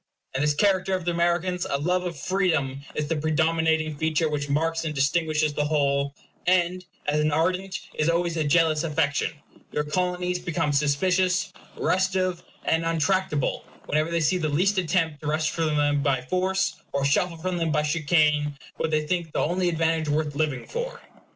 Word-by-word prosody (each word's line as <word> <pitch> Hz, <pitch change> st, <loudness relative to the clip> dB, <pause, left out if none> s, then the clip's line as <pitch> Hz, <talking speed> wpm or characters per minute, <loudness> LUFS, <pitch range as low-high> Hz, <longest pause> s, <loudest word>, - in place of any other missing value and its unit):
In 135 Hz, -, -1 dB
this 150 Hz, 0 st, +2 dB
character 190 Hz, +1 st, +2 dB
of 185 Hz, -2 st, -4 dB
the 175 Hz, -, +1 dB
Americans, 175 Hz, +1 st, 0 dB
a 140 Hz, -, +1 dB
love 180 Hz, +5 st, 0 dB
of 170 Hz, -3 st, -4 dB
freedom 155 Hz, -6 st, 0 dB
is 150 Hz, -, -1 dB
the 165 Hz, -, 0 dB
predominating 160 Hz, 0 st, +1 dB
feature 160 Hz, +2 st, +1 dB
which 145 Hz, -1 st, -3 dB
marks 165 Hz, +3 st, 0 dB
and 155 Hz, -2 st, -3 dB
distinguishes 155 Hz, +1 st, +1 dB
the 145 Hz, 0 st, 0 dB
whole; 140 Hz, -2 st, +1 dB, 0.3 s
and 180 Hz, 0 st, +2 dB, 0.2 s
as 150 Hz, +1 st, +1 dB
an 150 Hz, 0 st, +2 dB
ardent 185 Hz, +5 st, 0 dB
is 155 Hz, +1 st, +1 dB
always 170 Hz, 0 st, +1 dB
a 160 Hz, -, +1 dB
jealous 155 Hz, +1 st, +3 dB
affection, 150 Hz, -1 st, 0 dB, 0.4 s
your 150 Hz, -, 0 dB
Colonies 180 Hz, +3 st, -1 dB
become 165 Hz, -4 st, -1 dB
suspicious, 180 Hz, +6 st, +1 dB, 0.2 s
restive, 185 Hz, -1 st, +1 dB, 0.2 s
and 165 Hz, 0 st, +2 dB
untractable 165 Hz, -2 st, 0 dB, 0.2 s
whenever 155 Hz, +2 st, 0 dB
they 170 Hz, 0 st, 0 dB
see 180 Hz, +4 st, +2 dB
the 155 Hz, -2 st, 0 dB
least 190 Hz, +7 st, +2 dB
attempt 165 Hz, -4 st, 0 dB
to 150 Hz, -, -5 dB
wrest 155 Hz, +1 st, +1 dB
from 160 Hz, -2 st, 0 dB
them 145 Hz, -1 st, +2 dB
by 140 Hz, -2 st, +1 dB
force, 185 Hz, +7 st, 0 dB, 0.2 s
or 140 Hz, 0 st, 0 dB
shuffle 165 Hz, +4 st, +1 dB
from 180 Hz, +2 st, -2 dB
them 165 Hz, -2 st, 0 dB
by 150 Hz, 0 st, +2 dB
chicane, 150 Hz, -1 st, +2 dB, 0.2 s
what 160 Hz, -, -1 dB
they 155 Hz, -1 st, +1 dB
think 170 Hz, 0 st, -2 dB
the -, -, -2 dB
only 180 Hz, +3 st, +1 dB
advantage 165 Hz, -1 st, 0 dB
worth 150 Hz, 0 st, 0 dB
living 145 Hz, -4 st, -1 dB
for. 485 Hz, 0 st, -5 dB
160 Hz, 175 wpm, -25 LUFS, 150-180 Hz, 0.4 s, jealous